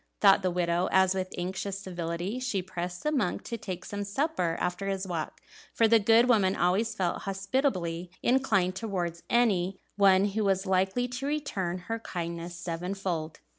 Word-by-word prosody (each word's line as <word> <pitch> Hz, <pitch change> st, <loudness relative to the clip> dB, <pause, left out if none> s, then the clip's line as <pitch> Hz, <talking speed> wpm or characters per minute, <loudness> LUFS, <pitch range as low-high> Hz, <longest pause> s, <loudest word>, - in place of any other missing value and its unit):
thought 195 Hz, -2 st, +6 dB
the 185 Hz, -, +1 dB
widow, 175 Hz, 0 st, 0 dB
as 190 Hz, 0 st, +4 dB
with 185 Hz, -1 st, -3 dB
anxious 190 Hz, +2 st, -3 dB
civility 175 Hz, +3 st, -4 dB
she 255 Hz, -6 st, -1 dB
pressed 180 Hz, 0 st, -5 dB
the 300 Hz, -, +1 dB
monk 245 Hz, -12 st, 0 dB
to 235 Hz, -, -4 dB
take 185 Hz, -5 st, -6 dB
some 205 Hz, 0 st, -4 dB
supper 200 Hz, -, -1 dB
after 180 Hz, +2 st, -2 dB
his 195 Hz, 0 st, -2 dB
walk; 165 Hz, -4 st, -4 dB, 0.4 s
for 225 Hz, -, +5 dB
the 225 Hz, 0 st, +6 dB
good 225 Hz, +3 st, +5 dB
woman 200 Hz, -6 st, +3 dB
always 205 Hz, +5 st, +1 dB
felt 180 Hz, -4 st, -1 dB
hospitably 195 Hz, -, -1 dB
inclined 215 Hz, -8 st, +2 dB
towards 180 Hz, -6 st, -3 dB
any 195 Hz, -6 st, +2 dB, 0.2 s
one 195 Hz, -1 st, +5 dB
who 215 Hz, +2 st, -1 dB
was 195 Hz, -1 st, +1 dB
likely 190 Hz, +6 st, +1 dB
to 250 Hz, +3 st, -4 dB
return 205 Hz, -12 st, -2 dB
her 225 Hz, +2 st, -3 dB
kindness 170 Hz, -3 st, -5 dB
sevenfold. 175 Hz, -2 st, -4 dB
190 Hz, 165 wpm, -29 LUFS, 180-220 Hz, 0.4 s, thought